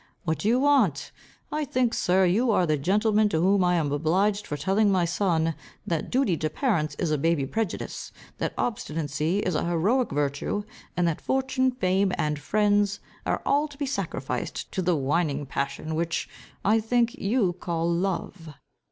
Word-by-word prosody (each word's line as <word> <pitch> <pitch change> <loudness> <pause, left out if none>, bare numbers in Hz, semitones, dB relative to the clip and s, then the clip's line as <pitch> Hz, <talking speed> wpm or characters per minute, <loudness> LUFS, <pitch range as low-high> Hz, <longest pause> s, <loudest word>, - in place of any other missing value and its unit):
What 160 -4 -1
do 200 - -1
you 240 +3 +4
want? 255 - +2 0.4
I 305 0 -1
think, 250 -4 0
Sir, 185 +1 +3
you 215 +8 +2
are 195 -5 +3
the 155 -2 +2
gentleman 210 +7 +2
to 160 - 0
whom 190 +2 +3
I 180 0 +3
am 155 -4 0
obliged 190 +8 +1
for 150 - -3
telling 200 +5 +2
my 185 -2 +2
son, 170 -2 +1 0.3
that 165 -3 -2
duty 250 -9 +2
to 155 - -1
parents 155 - 0
is 170 -4 -1
a 150 - +1
baby 165 -2 +1
prejudice, 220 +6 -4 0.3
that - - -2
obstinacy 160 - -1
is 185 - -1
a - - 0
heroic 195 +10 +1
virtue, 145 +7 -1 0.3
and 175 -1 +2
that 165 - -2
fortune, 265 0 +1
fame, 195 -5 +1
and 150 -1 -1
friends, 205 +4 +2 0.3
are - - -1
all 290 +2 +2
to 290 -2 -14
be 285 - -2
sacrificed 275 - -4
to 190 - -2
the 180 -1 +2
whining 145 +1 0
passion, 140 +3 -3
which, 165 +1 -1 0.4
I 215 +3 +4
think, 235 +1 +1
you 200 -3 +1
call 170 -2 -2
love." 170 -2 -2
185 Hz, 175 wpm, -26 LUFS, 160-215 Hz, 0.4 s, you